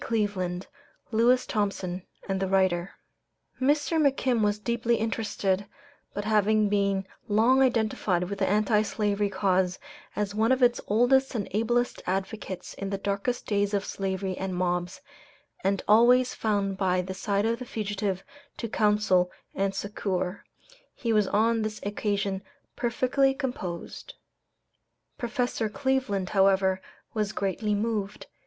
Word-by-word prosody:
D. - - -6
Cleveland, 195 -5 -1 0.5
Lewis 240 +3 +4
Thompson, 195 -4 -2 0.3
and 195 -1 -1
the 190 - 0
writer. 185 -1 +1 0.7
Mr. 295 +4 +2
McKim 265 -4 +2
was 205 0 +2
deeply 235 +2 0
interested; 210 -3 -1 0.5
but 205 +1 -3
having 215 0 +3
been 200 -1 +1 0.2
long 230 +6 +4
identified 220 -7 +1
with 195 +2 -5
the 190 - +2
Anti 210 +1 +3
Slavery 205 -1 0
cause 185 -2 +1 0.4
as 205 -1 -1
one 220 +3 +2
of 260 0 +3
its 245 0 +4
oldest 250 +5 +3
and 205 -4 -2
ablest 240 +4 0
advocates 190 0 -3
in 195 - -5
the 195 - -2
darkest 200 +5 -2
days 205 -1 +1
of 200 - -1
slavery 190 -1 -2
and 190 -1 -3
mobs, 180 0 -1 0.6
and 195 0 +1
always 245 +4 +5
found 200 -3 0
by 185 -2 +2
the 190 +1 -5
side 200 +2 0
of 230 +1 0
the 250 - -6
fugitive 205 -4 -2 0.3
to 230 - -3
counsel 210 -4 +2 0.2
and 195 0 -1
succor, 195 -2 -3 0.5
he 230 -2 -1
was 210 -2 +3
on 225 +3 +2
this 215 0 -3
occasion 200 -1 -1 0.3
perfectly 255 +3 +1
composed. 250 - -5 1.0
Professor 240 -2 -1
Cleveland, 260 -6 0
however, 190 -1 +3 0.3
was 210 -3 -1
greatly 205 +2 -1
moved. 210 -1 -2
205 Hz, 135 wpm, -27 LUFS, 195-230 Hz, 1.0 s, always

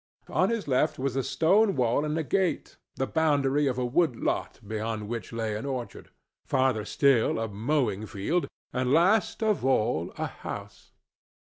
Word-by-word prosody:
On - - +2
his 230 -6 -2
left 130 -2 +1
was 130 -1 -2
a 135 - +1
stone 195 - +3
wall 125 +2 +2
and 150 +1 -1
a 160 - 0
gate, 185 +5 -1 0.2
the 130 - -1
boundary 145 -2 +2
of 130 -2 -1
a 125 - 0
wood 135 +2 +2
lot - - -2
beyond 110 0 -3
which 115 0 -5
lay 110 -2 -2
an 105 - -4
orchard, 130 -3 -5 0.3
farther 130 -5 +1
still 135 -5 +3
a 115 0 -1
mowing 110 -1 -1
field, 150 - -1 0.3
and 125 0 0
last 195 +8 +3
of 215 - +1
all 110 -10 +1
a - - -1
house. - - -8
130 Hz, 165 wpm, -27 LUFS, 115-155 Hz, 0.3 s, stone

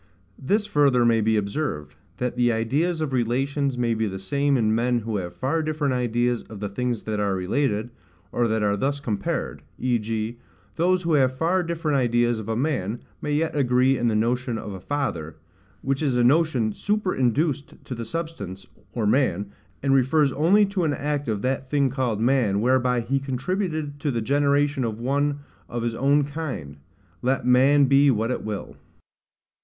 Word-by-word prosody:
This 205 +10 +1
further 140 -9 +3
may 115 -1 +3
be 110 +1 +2
observed, 100 - -3 0.2
That 125 +2 -2
the 120 -1 +3
ideas 145 +10 0
of 150 -4 -2
relations 135 +3 0
may 120 -1 +1
be 110 0 0
the 95 -1 -4
same 140 +9 +1
in 110 -2 +2
men 120 +1 +1
who 110 -1 -3
have 90 -2 -5
far 140 +5 0
different 155 -3 -1
ideas 120 -1 0
of 110 - -9
the 105 0 -3
things 120 +2 -2
that 110 -1 -2
are 100 -2 0
related, 105 +4 -1 0.4
or 120 -1 +1
that 110 -1 0
are 100 -1 +2
thus 140 +7 -1
compared: 110 -8 -3 0.2
v. 125 -2 +1
g. 110 +2 -3 0.4
those 180 +2 +2
who 165 -1 0
have 130 -3 +3
far 175 +5 +2
different 165 -4 -1
ideas 120 -1 +2
of 110 0 -7
a 110 - 0
man, 120 -5 -1 0.2
may 150 - -3
yet 160 +2 0
agree 130 -1 +3
in 120 -1 0
the 110 - +1
notion 120 +2 0
of 105 -2 -6
a 95 - -7
father; 90 - -3 0.5
which 135 +1 -1
is 135 -5 +1
a 120 - +3
notion 130 -4 +3
superinduced 150 - 0
to - - -5
the 115 -1 -5
substance, 110 - -5 0.3
or 115 -3 -1
man, 105 -4 +1 0.3
and 135 -1 +3
refers 135 +2 +3
only 180 +10 +4
to 195 -2 -2
an 150 -3 +1
act 145 0 -2
of 105 -3 -2
that 130 0 -1
thing 140 -2 +2
called 125 -5 -1
man 115 -4 +2
whereby 125 +1 +2
he 135 +4 0
contributed 145 +2 -3
to 145 - -1
the 120 -4 -1
generation 140 +2 +1
of 110 -2 -3
one 140 +3 0 0.3
of 120 -1 -3
his 120 -1 -1
own 140 +4 +3
kind, 140 - -5 0.4
let 130 +2 0
man 135 +3 +5
be 140 +1 +5
what 115 -1 +1
it - - -3
will. 105 -2 -5
130 Hz, 185 wpm, -24 LUFS, 115-145 Hz, 0.5 s, man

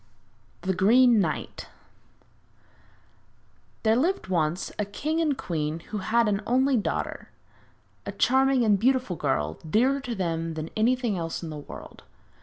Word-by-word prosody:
THE 190 0 0
GREEN 230 +5 +5
KNIGHT 165 -6 -3 2.2
There 220 0 +4
lived 325 - 0
once 170 0 0
a - - +2
king 305 +11 -2
and 300 -5 +1
queen 155 -1 -3
who 210 - -2
had 230 +4 +2
an 205 -1 0
only 260 +3 +3
daughter, 215 - -2 0.8
a - - -2
charming 265 -1 +3
and 205 -2 +3
beautiful 255 -4 +1
girl, 80 - -1
dearer 260 - +3
to 250 -4 -5
them 165 -3 -2
than 155 +1 -5
anything 235 -3 +1
else 165 +1 -4
in 160 - -5
the 150 - -6
world. 145 - -10
210 Hz, 140 wpm, -26 LUFS, 165-255 Hz, 2.2 s, GREEN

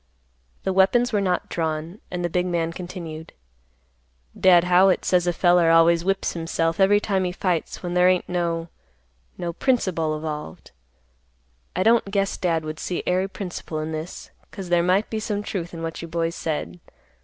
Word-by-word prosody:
The 190 - 0
weapons 235 +6 +3
were 205 - +2
not 180 -2 0
drawn, 160 +3 -3
and 175 -1 -3
the - - -1
big 180 +1 0
man 165 -2 -1
continued, 170 -3 -8 1.0
"Dad 175 -2 +5
Howitt 180 +1 +4
says 180 -1 +2
a - - +3
feller 175 -1 +4
always 165 +1 +5
whips 195 +1 0
himself 165 0 -1
every 200 +2 +5
time 195 -2 0
he 180 - -1
fights 180 -2 -2
when 175 -1 -3
there 180 0 +5
ain't 185 -1 +1
no—no 165 - -5
principle 165 - 0
evolved. 150 - -6 1.0
I 185 - +1
don't 225 -1 +3
guess 195 -1 0
Dad 165 -4 -1
would 155 0 -6
see 180 - -3
ary 185 +2 +1
principle 180 -5 -6
in 155 +1 -3
this, 155 +3 -7 0.2
'cause 190 -3 -8
there 175 -1 +4
might 185 +4 +1
be 220 - -1
some 210 -1 -3
truth 180 -4 -4
in 165 -1 -7
what 165 0 -4
you 170 - -6
boys 165 0 -1
said. 90 - -4
175 Hz, 170 wpm, -23 LUFS, 165-190 Hz, 1.0 s, Dad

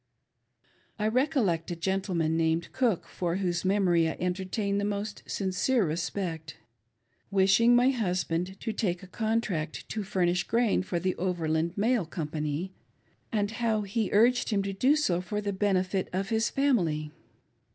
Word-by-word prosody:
I 210 - 0
recollect 220 - +1
a 175 - -2
gentleman 170 -2 0
named 165 +1 0
Cook, 235 -9 +1
for 175 -2 -2
whose 180 -2 -1
memory 185 -4 +3
I - - -5
entertain 190 +3 -1
the - - -1
most 205 +1 -3
sincere 200 +4 +1
respect, 165 0 -3 0.7
wishing 195 +5 +4
my 250 +2 +5
husband 180 -5 -2
to 225 - -2
take 185 -5 -1
a - - -10
contract 215 -6 -2
to 220 - -3
furnish 180 -2 +1
grain 230 -2 +2
for 180 -2 -2
the 185 +1 0
Overland 170 -1 -1
Mail 220 -3 +1
Com 160 -2 -4
pany, 155 +4 -3 0.6
and 205 -2 0
how 225 -2 0
he 205 +2 -1
urged 240 +4 +4
him 200 -3 +1
to 195 0 -3
do 260 +9 +3
so 185 - +1
for 195 +3 -3
the 205 -1 -2
benefit 190 -1 0
of 195 +2 -2
his 225 0 +1
family. 170 - +1
190 Hz, 150 wpm, -28 LUFS, 175-215 Hz, 0.7 s, my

